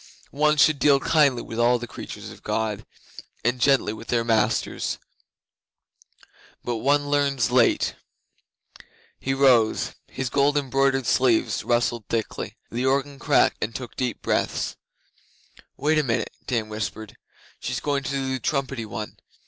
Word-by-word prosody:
One 150 +1 +2
should 155 -1 +4
deal 140 +1 +5
kindly 140 -4 +3
with 115 - -6
all 120 +1 +4
the 120 - -6
creatures - - -8
of - - -14
God, 110 -2 -2 0.6
and 120 +1 +1
gently 135 -6 +3
with 115 +1 -10
their 120 -1 +1
masters. 110 -2 0 1.7
But 120 -1 -2
one 145 +4 +1
learns 140 -5 +1
late.' 125 -2 +3 1.2
He 135 0 -1
rose, 125 -5 +3
and - - -23
his 130 -2 -2
gold 145 +1 +3
embroidered 135 -1 +1
sleeves 125 -1 +2
rustled 120 -2 0
thickly. 115 -2 -3
The 120 +2 -2
organ 140 +1 0
cracked - - +3
and 115 - -4
took 125 -2 -7
deep 125 -2 -3
breaths. - - -1 1.0
'Wait 155 +1 +2
a - - +2
minute,' 115 -4 -1
Dan 115 -4 -1
whispered. 110 0 -5 0.4
'She's 125 0 -3
going 140 -1 -1
to 135 - -5
do 135 -1 -2
the 130 - -2
trumpety 135 -4 -2
one. 105 0 -6
130 Hz, 145 wpm, -24 LUFS, 115-140 Hz, 1.7 s, deal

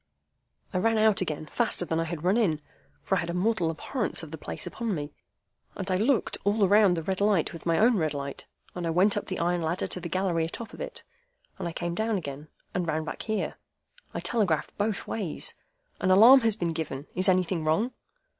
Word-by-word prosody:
I 185 - +1
ran 225 +3 +2
out 215 -2 +4
again 155 -3 -3
faster 225 0 0
than 165 -1 -1
I 165 - 0
had 165 -1 -5
run 185 +3 +3
in 185 -10 +2 0.4
(for 195 - +1
I - - +2
had 170 - -3
a 170 - -2
mortal 185 -2 +1
abhorrence 200 - -2
of 155 - -9
the 160 - -6
place - - -3
upon 220 +3 -3
me), 145 -1 -5 0.6
and 190 -1 -3
I 185 - +2
looked 230 +4 +1
all 205 0 +3
round 200 -2 +5
the 165 - -3
red 190 +3 -2
light 200 -5 +2
with 165 0 -8
my 165 -1 +3
own 230 +1 +4
red 155 -4 0
light, 140 0 -5 0.3
and 175 -2 -3
I - - 0
went 185 +5 +4
up - - -3
the 185 - -3
iron 175 +1 0
ladder 165 +3 -1
to - - -2
the 170 -1 -6
gallery 180 -2 0
atop 225 +8 -7
of - - -9
it, - - -6 0.6
and - - -2
I - - -3
came 170 +1 -3
down 220 +3 0
again, 145 -3 -6 0.3
and 180 -1 -1
ran 155 0 0
back 155 - -6
here. 215 -1 -2 0.5
I - - -4
telegraphed 195 -10 0
both 205 0 -1
ways, 195 -8 -2 0.5
'An 185 - 0
alarm 225 +8 +9
has 225 -4 +2
been 175 -5 -1
given. 150 -3 -4
Is 185 +1 +3
anything 180 -2 +1
wrong? 160 +11 +1
180 Hz, 220 wpm, -27 LUFS, 165-210 Hz, 0.6 s, alarm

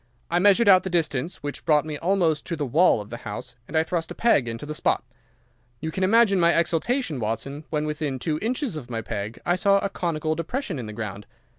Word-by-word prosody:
I 175 - +3
measured 205 +4 +5
out 185 -2 +8
the 190 - -4
distance, 160 -3 -1
which 145 0 -5
brought 150 -1 +3
me 155 -1 -4
almost 170 -2 +1
to 170 - -2
the 150 -2 -2
wall 150 -2 +4
of 105 - -12
the 120 - -5
house, 125 0 -7
and 160 - -2
I 160 - +4
thrust 165 0 -2
a - - -7
peg 185 - +3
into 115 +5 -5
the 150 - -5
spot. - - 0 0.8
You 160 +1 -4
can 190 - -2
imagine 200 0 +4
my 170 0 +5
exultation, 170 - 0
Watson, 120 +7 -4
when 150 -1 -1
within 150 -3 -2
two 155 +4 -1
inches 245 - -1
of 130 -5 -8
my 115 -2 -3
peg 105 0 -5
I 175 - +2
saw 200 +2 +4
a 200 - -1
conical 160 -4 -1
depression 175 - -3
in 115 - -5
the 105 - -7
ground. 105 -2 -6
160 Hz, 230 wpm, -25 LUFS, 135-185 Hz, 0.8 s, out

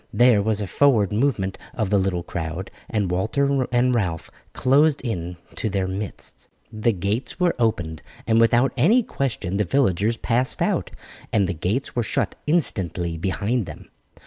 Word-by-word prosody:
There 120 -4 +5
was 105 0 0
a - - -1
forward 110 -2 +3
movement 105 -5 0 0.2
of 110 -4 -1
the 100 - +4
little 95 -2 -1
crowd, 85 +2 -5 0.2
and 100 -5 0
Walter 130 +8 +1
and 125 +1 +3
Ralph 90 -9 -2 0.2
closed 145 +3 +3
in 90 -8 -4 0.2
to 110 - -2
their 95 -2 -1
midst. 95 +1 -6 0.2
The 110 +2 +1
gates 105 - -2
were 180 -1 +3
opened, 85 -9 0 0.2
and 115 0 +3
without 120 +3 +3
any 210 - +4
question 115 - -2
the 105 - +2
villagers 110 -1 +1
passed 125 +3 0
out, - - 0 0.4
and 105 -3 +3
the 95 - -1
gates 100 - -2
were 120 - +2
shut 110 - -1
instantly 90 - 0
behind 100 +5 -1
them. 75 - -10
110 Hz, 160 wpm, -23 LUFS, 95-125 Hz, 0.4 s, There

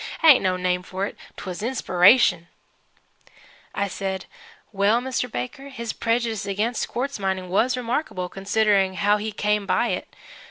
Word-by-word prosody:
It - - +6
ain't 280 - +8
no 185 -1 +1
name 180 0 0
for 190 +2 -4
it. - - -7 0.2
'Twas 185 0 -6
inspiration!" 215 -5 +4 1.3
I 200 - 0
said, 190 0 -4 0.5
"Well, 205 +3 +2
Mr. 250 -1 -3
Baker, 270 +4 -5
his 235 -4 -5
prejudice 230 -3 -1
against 215 +4 -1
quartz 270 0 -3
mining 190 -2 -2
was 235 +7 +2
remarkable, 240 -6 -2
considering 195 0 +1
how 205 +2 +2
he 215 +1 -4
came 210 -1 0
by - - +1
it. - - -4
210 Hz, 150 wpm, -23 LUFS, 190-235 Hz, 1.3 s, ain't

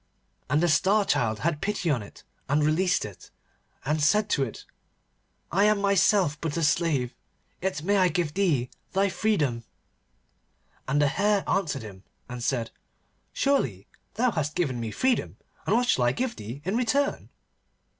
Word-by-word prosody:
And 150 +5 +2
the - - +4
Star 195 +6 +3
Child 110 - 0
had 155 -2 -1
pity 200 -5 -1
on 125 -6 0
it, 100 - -13 0.3
and 145 +2 +2
released 165 +4 +2
it, 105 -3 -11 0.6
and 150 +2 0
said 210 +7 +3
to 140 - +2
it, 115 - -7 0.9
'I 195 +4 +3
am 210 -1 +3
myself 200 -5 +2
but 160 -1 -2
a 165 - 0
slave, 145 -5 +1 0.5
yet 175 -5 -2
may 200 +3 +2
I 185 -1 +4
give 170 -3 -1
thee 155 -11 +1 0.2
thy 200 +1 +2
freedom.' 150 - 0 1.2
And 140 +2 +1
the 145 - +4
Hare 200 +6 +1
answered 150 -10 0
him, 100 -3 -11 0.2
and 125 -1 -6
said: 120 -3 -1 0.6
'Surely 125 - 0 0.3
thou 245 +3 +2
hast 155 -4 -2
given 140 -9 -1
me 115 -1 -3
freedom, 255 - 0 0.3
and - - +3
what 245 +1 +2
shall 125 - +3
I 120 - +2
give 255 - -2
thee 115 +7 -8
in 190 +4 -1
return? 275 +4 0
160 Hz, 165 wpm, -26 LUFS, 130-200 Hz, 1.2 s, the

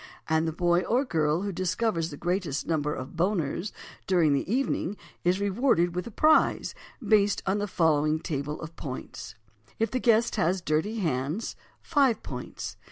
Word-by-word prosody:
and 160 0 +2
the - - 0
boy 175 +1 +2
or 250 +8 +1
girl 160 - +1
who 200 - -2
discovers 185 -1 -1
the 145 - -8
greatest 175 -4 -1
number 150 -3 0
of 130 -3 -5
"Boners" 175 0 -1 0.4
during 170 -6 +4
the 140 +7 -1
evening 235 -6 0 0.3
is 180 +2 +2
rewarded 200 -4 +2
with 180 +5 -3
a - - -5
prize, 310 +8 +3 0.3
based 205 -2 +3
on 195 +2 +1
the 205 - -1
following 155 -4 +2
table 150 -2 -3
of 160 +1 -8
points: 130 -5 -7 0.4
If 225 -1 0
the 255 - 0
guest 230 -1 +3
has 185 0 +2
dirty 165 +6 0
hands, 150 - -2 0.3
5 275 -7 +2
points. - - -6
175 Hz, 165 wpm, -27 LUFS, 155-210 Hz, 0.4 s, during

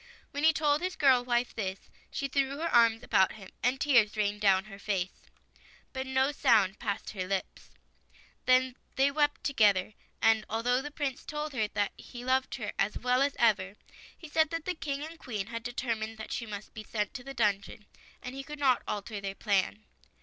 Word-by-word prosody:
When 285 +1 -4
he 320 - +7
told 300 -1 +2
his 365 0 -2
girl 260 -4 +5
wife 240 0 0
this, 195 -3 -5 0.2
she 275 - -3
threw 275 0 0
her 330 +2 -2
arms 230 0 +5
about 190 -5 +3
him 195 -3 -12
and 255 +2 +1
tears 235 -8 +4
rained 205 0 0
down 195 -2 +4
her 200 -2 -11
face, 190 -3 -3 0.6
but 265 0 -4
no 265 +1 +2
sound 220 -9 +3
passed 210 -2 -3
her 185 -3 -4
lips. 195 0 -4 0.8
Then 255 0 +4 0.2
they 275 +1 +3
wept 290 0 +1
together, 210 -7 +3 0.3
and 225 -1 +4
although 245 +3 +1
the 295 - -6
Prince 285 -3 -3
told 300 0 -4
her 220 -5 0
that 205 -2 +1
he 245 -1 -9
loved 260 0 +1
her 215 -5 -4
as 195 +2 +1
well 250 +1 +2
as 280 0 +2
ever, 200 -4 +2 0.4
he 330 - -10
said 315 0 +2
that 330 -1 -4
the 365 - 0
King 285 -4 -4
and 325 +1 -10
Queen 210 -6 -4
had 230 +1 -5
deter 245 0 -2
mined 220 0 -6
that 220 - -8
she 230 - -3
must 205 -1 -7
be 215 - -7
sent 210 -1 -2
to 250 - -7
the 275 +1 -8
dungeon, 210 -2 0 0.4
and 250 - -6
he 275 0 -6
could 300 +1 -8
not 265 -4 +3
alter 205 0 -4
their 195 0 -4
plan. 210 +1 0
240 Hz, 200 wpm, -30 LUFS, 210-275 Hz, 0.8 s, he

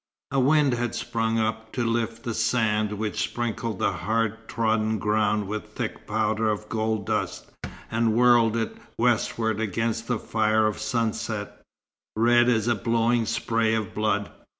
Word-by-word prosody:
A 135 - +1
wind 140 0 +4
had 120 0 -2
sprung 115 0 -1
up, 110 0 -2
to 120 - -1
lift 115 0 -1
the 115 - -3
sand 110 -2 +1
which 105 0 -2
sprinkled 115 -2 -2
the 100 - +1
hard 115 +4 -2
trodden 110 -1 0
ground 105 0 +1
with 105 +1 -6
thick - - -5
powder 110 0 +1
of 105 0 -2
gold 110 -2 -1
dust, - - -3 0.4
and 115 -1 +2
whirl 120 -2 +5
it 115 -1 -2 0.2
westward 110 -2 +1
against 115 +2 -1
the 125 - 0
fire 110 0 +1
of 105 -1 -1
sunset, 110 -3 -2 0.5
red 120 +2 +4
as 115 -2 +2
a 120 - +4
blowing 115 0 +1
spray 115 -1 +1
of 110 -4 -3
blood. 105 -1 0
110 Hz, 150 wpm, -25 LUFS, 110-115 Hz, 0.5 s, whirl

